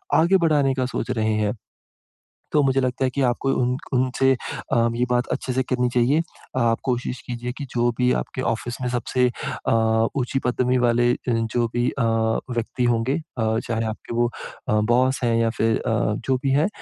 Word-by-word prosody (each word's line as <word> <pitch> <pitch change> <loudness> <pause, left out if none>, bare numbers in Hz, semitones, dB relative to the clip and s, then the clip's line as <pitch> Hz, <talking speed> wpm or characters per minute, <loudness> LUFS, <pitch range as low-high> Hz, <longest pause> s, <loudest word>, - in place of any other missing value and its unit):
आगे 170 +5 +5
बढ़ाने 150 -6 +2
का 130 -1 0
सोच 125 - -3
रहे 110 -1 0
हैं। 105 -1 0 1.0
तो 150 - +4
मुझे 135 0 +2
लगता 130 +1 -1
है - - +1
कि 140 - 0
आपको 125 +2 +1
उन्क 125 +3 0
उनसे 130 +1 +2 0.4
अ, - - +4 0.2
ये 125 +1 +1
बात 125 0 +1
अच्छे-से 130 0 -1
करनी 125 -1 0
चाहिए। 130 +6 +3 0.4
आप 115 -2 +2
कोशिश 125 -1 -2
कीजिए 120 0 -4
कि 140 - -5
जो 120 0 +2
भी 125 0 +3
आपके - - -5
ऑफ़िस 120 0 -2
में 125 - -1
सबसे 125 +1 +1 0.4
अ, - - +3 0.5
ऊँची 130 +1 0
पदवी 125 +1 +1
वाले 120 0 +3
अ, - - 0
जो 115 +1 0
भी 120 0 +1
अ, 125 - -2 0.5
व्यक्ति 120 +1 -2
होंगे 120 +2 +1 0.2
अ, 110 0 +1
चाहे 115 -1 -1
आपके 110 +1 -5
वो 120 0 +3 0.4
अ, - - +3 0.2
बॉस 130 +2 +3
हैं 115 -1 +2
या 115 - +2
फिर 110 0 +2
अ, - - -3 0.3
जो 130 -1 +2
भी 135 - +1
हैं। 145 +6 +3
125 Hz, 190 wpm, -23 LUFS, 120-130 Hz, 1.0 s, आगे